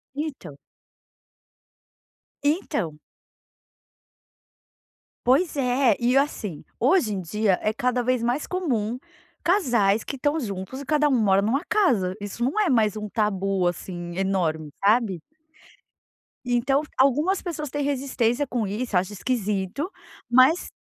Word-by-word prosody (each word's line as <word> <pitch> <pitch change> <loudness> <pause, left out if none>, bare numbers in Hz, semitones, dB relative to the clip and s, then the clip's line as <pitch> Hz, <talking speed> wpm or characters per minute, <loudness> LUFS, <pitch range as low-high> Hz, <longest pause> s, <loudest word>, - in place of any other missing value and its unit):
Então. 275 - -5 1.9
Então. 285 - -1 2.3
Pois 295 +7 +3
é. 250 -3 +2
E 245 +2 +2
assim, 215 - -1 0.2
hoje 255 - +3
em 190 - -3
dia, 200 +2 0
é 215 - +1
cada 250 +2 0
vez 250 -1 0
mais 245 +5 -1
comum 250 - -1 0.4
casais 235 - +2
que - - -5
estão 290 +4 0
juntos 200 +1 -5
e 280 - -8
cada 300 0 +2
um - - 0
mora 195 -2 +4
numa 270 - 0
casa. 225 - +2
Isso 205 +4 -5
não 275 - 0
é 405 -6 +2
mais 220 -4 +2
um 210 0 -4
tabu, 195 -3 0
assim, 175 0 -5
enorme, 170 -6 -1
sabe? 210 -5 +2 1.2
Então, 250 +3 +2 0.2
algumas 295 +9 +3
pessoas 305 -5 -4
têm 290 +1 -2
resistência 270 -1 0
com 240 -3 -1
isso 210 +1 -2
acho 185 +3 -1
esquisito 210 - -2 0.4
mas 260 +8 +4
240 Hz, 125 wpm, -24 LUFS, 195-280 Hz, 2.3 s, mora